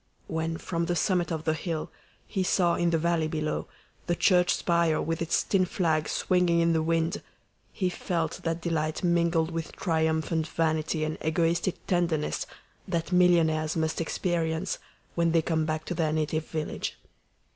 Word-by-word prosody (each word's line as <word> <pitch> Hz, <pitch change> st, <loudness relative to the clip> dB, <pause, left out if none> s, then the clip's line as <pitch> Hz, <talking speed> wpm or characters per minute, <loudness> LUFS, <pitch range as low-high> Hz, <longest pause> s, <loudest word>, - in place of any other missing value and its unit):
When, 160 Hz, 0 st, -2 dB
from 170 Hz, 0 st, -2 dB
the 175 Hz, -, 0 dB
summit 180 Hz, 0 st, +1 dB
of 160 Hz, -2 st, -2 dB
the 155 Hz, -, +1 dB
hill, 160 Hz, -1 st, -4 dB, 0.3 s
he 190 Hz, -, -2 dB
saw 180 Hz, -2 st, +2 dB
in 175 Hz, 0 st, +1 dB
the 165 Hz, -, +2 dB
valley 165 Hz, -1 st, +1 dB
below 155 Hz, -1 st, -2 dB, 0.4 s
the 175 Hz, -, +1 dB
church 180 Hz, 0 st, +4 dB
spire 170 Hz, -2 st, +2 dB
with 165 Hz, +1 st, -2 dB
its 165 Hz, -, +1 dB
tin 195 Hz, -2 st, +2 dB
flag 160 Hz, -4 st, 0 dB
swinging 180 Hz, -2 st, +2 dB
in 170 Hz, 0 st, +3 dB
the 160 Hz, -, +2 dB
wind, 165 Hz, +2 st, 0 dB, 0.5 s
he 185 Hz, -, -1 dB
felt 170 Hz, -3 st, -2 dB
that 165 Hz, 0 st, -2 dB
delight 160 Hz, 0 st, -1 dB
mingled 170 Hz, -1 st, +2 dB
with 165 Hz, -1 st, -4 dB
triumphant 160 Hz, -1 st, 0 dB
vanity 155 Hz, 0 st, 0 dB
and 155 Hz, 0 st, -3 dB
egoistic 165 Hz, +3 st, 0 dB
tenderness 170 Hz, -4 st, 0 dB, 0.4 s
that 170 Hz, -1 st, -2 dB
millionaires 165 Hz, -3 st, +3 dB
must 160 Hz, +1 st, 0 dB
experience 165 Hz, +1 st, -1 dB, 0.3 s
when 170 Hz, -1 st, +1 dB
they 165 Hz, -, +4 dB
come 160 Hz, -1 st, 0 dB
back 155 Hz, 0 st, -2 dB
to -, -, -3 dB
their 160 Hz, -3 st, 0 dB
native 155 Hz, 0 st, -1 dB
village. 155 Hz, -2 st, -4 dB
165 Hz, 160 wpm, -28 LUFS, 160-175 Hz, 0.5 s, church